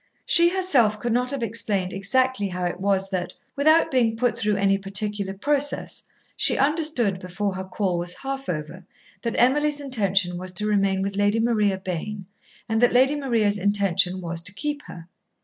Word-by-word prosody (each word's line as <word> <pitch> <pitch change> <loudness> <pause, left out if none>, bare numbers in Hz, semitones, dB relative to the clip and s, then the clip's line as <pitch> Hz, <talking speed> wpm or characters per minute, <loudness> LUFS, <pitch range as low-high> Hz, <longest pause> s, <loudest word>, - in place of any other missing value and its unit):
She 340 0 +6
herself 280 - +2
could 240 0 -1
not 250 +1 0
have 275 -3 -2
explained 200 -4 -1
exactly 215 +2 +1
how 180 -1 -4
it 175 +1 -3
was 195 0 0
that, 180 -2 -3 0.2
without 310 +3 +4
being 230 -4 +2
put 245 +1 +1
through 210 -1 0
any 195 0 +2
particular 200 0 -3
process, 290 +6 0 0.3
she - - +3
understood, 280 - +1
before 190 +2 -3
her 190 0 -5
call 185 -1 -2
was 175 +1 -3
half 270 -2 -5
over, 160 +3 -5 0.4
that 230 -1 -3
Emily's 295 +4 +2
intention 195 -9 0
was 185 0 -7
to 210 +4 -2
remain 195 -2 +1
with 195 0 -3
Lady 205 +2 +2
Maria 215 -4 +1
Bayne 190 +2 -5 0.4
and 225 0 0
that 245 - +4
Lady 265 +4 +4
Maria's 230 -8 0
intention 190 -2 +1
was 170 -1 0
to 190 +3 -4
keep 295 +4 -3
her. 170 -1 -10
205 Hz, 175 wpm, -24 LUFS, 190-255 Hz, 0.4 s, She